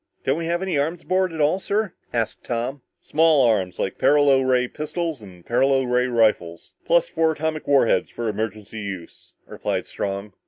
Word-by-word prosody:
"Don't 135 +4 0
we 165 - -3
have 170 +2 -1
any 185 -6 0
arms 165 +4 -2
aboard 185 -1 +1
at 160 - -7
all, 155 +5 +2
sir?" 205 0 -1 0.2
asked 115 -2 -2
Tom. 125 +3 -3 0.2
"Small 155 -4 +3
arms, 95 -6 +1
like 95 - -3
paralo 145 -2 +4
ray 130 -1 +2
pistols 155 0 -4
and 90 -4 -14
paralo 135 +2 +2
ray 125 0 +1
rifles. 105 -8 0
Plus - - +3
four 160 - +1
atomic 155 0 -3
war 140 -3 +5
heads - - +1
for 120 - -5
emergency 110 0 -4
use," 95 -5 -8
replied - - -3
Strong. 100 +1 -4
135 Hz, 180 wpm, -23 LUFS, 110-160 Hz, 0.2 s, war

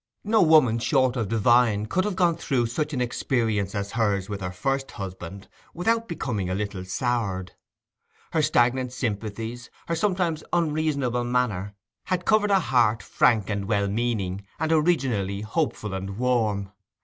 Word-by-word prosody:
No 215 +1 +3
woman 155 -9 +5
short 130 0 +2
of 115 -5 -1
divine 115 0 +3
could 185 - 0
have 210 -3 -2
gone 175 -3 +3
through 125 -6 0
such 150 +6 -2
an 130 -4 -2
experience 110 -5 -1
as 100 0 -3
hers 105 -4 0
with 100 -1 -4
her 90 - -2
first 135 +9 -2
husband 95 0 -7 0.3
without 230 +6 +1
becoming 120 - -3
a 95 - -1
little 100 -2 -3
soured. 100 -2 -2 0.8
Her 160 - +2
stagnant 125 -2 +2
sympathies, 115 0 -4 0.2
her 165 - 0
sometimes 175 -3 0
unreasonable 150 -7 0
manner, 110 -6 -1 0.3
had 180 -1 -1
covered 215 -1 +3
a 195 -1 +5
heart 120 -9 +2
frank 110 -5 +2
and 100 -2 -2
well 100 -2 +1
meaning, 100 -3 -1 0.2
and 160 +1 -1
originally 130 - +1
hopeful 110 - -2
and 95 +1 -5
warm. 110 -6 0
120 Hz, 150 wpm, -25 LUFS, 100-150 Hz, 0.8 s, woman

